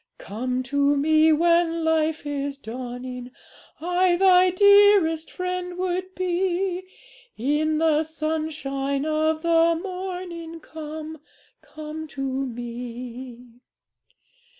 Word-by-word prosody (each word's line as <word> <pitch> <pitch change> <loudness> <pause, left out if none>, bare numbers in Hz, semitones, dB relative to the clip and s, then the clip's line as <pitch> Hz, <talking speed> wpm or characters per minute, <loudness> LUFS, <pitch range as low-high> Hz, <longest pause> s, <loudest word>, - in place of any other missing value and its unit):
'"Come 250 +5 -3
to 285 +2 +1
Me 310 +2 +4
when 335 +1 +2
life 320 -1 +1
is 285 -1 -3
dawning, 250 0 -7 0.5
I 355 +2 +2
thy 370 0 +5
dearest 400 -4 +5
Friend 360 -1 -4
would 370 +1 -3
be; 365 0 -1 0.6
In 300 +5 +1
the 315 -1 +3
sunshine 305 -3 -2
of 315 +1 0
the 335 0 +3
morning, 360 -3 -6
Come, 315 0 -8 0.4
come 310 +1 -8
to 275 -3 -5 0.2
Me. 245 0 -8
315 Hz, 95 wpm, -24 LUFS, 275-350 Hz, 0.6 s, thy